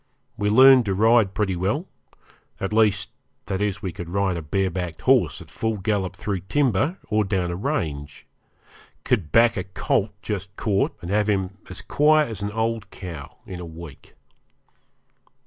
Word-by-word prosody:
We 105 Hz, -2 st, 0 dB
learned 130 Hz, +2 st, +7 dB
to 100 Hz, -2 st, 0 dB
ride 110 Hz, -1 st, +4 dB
pretty 100 Hz, -3 st, 0 dB
well 100 Hz, -, -1 dB, 0.7 s
at 95 Hz, +2 st, -3 dB
least, 110 Hz, -3 st, +2 dB, 0.3 s
that 95 Hz, +1 st, -3 dB
is 105 Hz, 0 st, -1 dB
we 95 Hz, -, -2 dB
could 85 Hz, 0 st, -8 dB
ride 95 Hz, 0 st, 0 dB
a 85 Hz, -, -3 dB
bare 95 Hz, +5 st, -1 dB
backed 90 Hz, -2 st, -5 dB
horse -, -, +3 dB
at -, -, -19 dB
full 110 Hz, -1 st, -2 dB
gallop 100 Hz, -2 st, -1 dB
through 100 Hz, 0 st, -3 dB
timber 135 Hz, -, +1 dB
or 105 Hz, 0 st, +2 dB
down 95 Hz, -3 st, -1 dB
a -, -, -3 dB
range; 75 Hz, -, -3 dB, 0.8 s
could 95 Hz, -11 st, 0 dB
back 115 Hz, 0 st, +5 dB
a 90 Hz, -, -1 dB
colt 95 Hz, +2 st, 0 dB
just 100 Hz, -1 st, -4 dB
caught 100 Hz, -2 st, 0 dB
and 85 Hz, -, -5 dB
have 105 Hz, +1 st, +2 dB
him 95 Hz, -1 st, -1 dB
as 90 Hz, -, -6 dB
quiet 155 Hz, -1 st, +3 dB
as 105 Hz, -, -6 dB
an 100 Hz, -, -2 dB
old 110 Hz, -1 st, -2 dB
cow 85 Hz, -9 st, -9 dB
in 90 Hz, -2 st, -7 dB
a 90 Hz, -, -6 dB
week. 80 Hz, -3 st, -12 dB
100 Hz, 170 wpm, -23 LUFS, 90-110 Hz, 0.8 s, learned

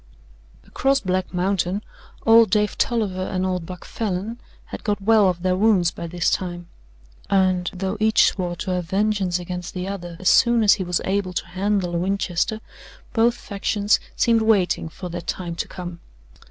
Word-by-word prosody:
Across 270 Hz, 0 st, +1 dB
Black 185 Hz, -1 st, -1 dB
Mountain 185 Hz, +2 st, -1 dB, 0.4 s
old 225 Hz, -1 st, +7 dB
Dave 210 Hz, +2 st, +1 dB
Tolliver 210 Hz, -6 st, 0 dB
and 185 Hz, 0 st, -2 dB
old 180 Hz, -3 st, -2 dB
Buck 180 Hz, -1 st, -9 dB
Falin 215 Hz, +2 st, -3 dB, 0.3 s
had -, -, -8 dB
got 205 Hz, -2 st, 0 dB
well 210 Hz, -1 st, +4 dB
of 175 Hz, -1 st, -3 dB
their 185 Hz, 0 st, +2 dB
wounds 190 Hz, -4 st, +3 dB
by 170 Hz, -, -7 dB
this 175 Hz, +1 st, 0 dB
time, 175 Hz, -2 st, -3 dB, 0.6 s
and 185 Hz, -2 st, +2 dB
though 190 Hz, +2 st, -3 dB
each 220 Hz, 0 st, +4 dB
swore 180 Hz, -2 st, -1 dB
to 185 Hz, +2 st, -4 dB
have 180 Hz, -1 st, -1 dB
vengeance 195 Hz, -1 st, 0 dB
against 180 Hz, 0 st, -6 dB
the 180 Hz, +1 st, -3 dB
other 175 Hz, -4 st, -6 dB
as 185 Hz, -, -3 dB
soon 235 Hz, -2 st, +5 dB
as 205 Hz, -, +7 dB
he 195 Hz, -, -2 dB
was 175 Hz, -1 st, -1 dB
able 190 Hz, -1 st, -1 dB
to -, -, -2 dB
handle 190 Hz, 0 st, -1 dB
a 170 Hz, -, 0 dB
Winchester, 195 Hz, +3 st, -1 dB, 0.5 s
both 235 Hz, +1 st, +3 dB
factions 205 Hz, -1 st, 0 dB, 0.2 s
seemed 230 Hz, -1 st, +3 dB
waiting 195 Hz, -7 st, +2 dB
for 180 Hz, +3 st, -8 dB
that 175 Hz, 0 st, -6 dB
time 175 Hz, -2 st, -3 dB
to 170 Hz, -, -4 dB
come. 175 Hz, -2 st, -7 dB
185 Hz, 175 wpm, -22 LUFS, 180-210 Hz, 0.6 s, old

